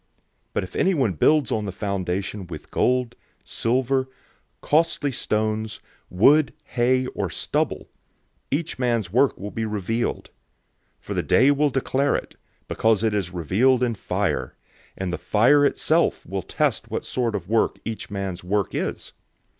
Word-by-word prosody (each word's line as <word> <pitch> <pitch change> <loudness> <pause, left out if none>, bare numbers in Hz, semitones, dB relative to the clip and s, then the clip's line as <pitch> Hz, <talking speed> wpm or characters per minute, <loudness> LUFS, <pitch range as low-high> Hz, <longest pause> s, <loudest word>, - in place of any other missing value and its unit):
003:012 - - -45 0.5
But - - 0
if 90 - -9
anyone 140 - +2
builds 145 - +3
on 105 -1 0
the 100 - -3
foundation 100 0 -3
with 80 -3 -9
gold, 125 -2 +1 0.3
silver, 130 +2 0 0.5
costly 150 -2 +1
stones, 110 -3 -1 0.3
wood, 140 +11 +4 0.2
hay, 130 +1 +2
or 100 -7 -3
stubble; - - -2 0.6
003:013 140 - +3
each 165 -5 -7
man's 115 -7 0
work 130 +3 +3
will 100 +1 -6
be 115 - -3
revealed. 110 +2 -2 0.7
For - - -6
the - - 0
Day 135 +4 +4
will 145 +1 +2
declare 135 +1 +1
it, - - -5 0.3
because 110 -1 +2
it 110 -2 +2
is 100 -4 -1
revealed 110 - +2
in 120 -2 +1
fire; 105 - -2 0.4
and 95 -2 -3
the - - -3
fire 125 +7 +4
itself 140 - +2
will - - -3
test - - -1
what - - -3
sort 120 -4 -1
of 95 -3 -4
work 115 +2 +1
each 115 -1 -5
man's 95 -3 -4
work 100 +1 -1
is. - - -3
115 Hz, 155 wpm, -24 LUFS, 100-130 Hz, 0.7 s, wood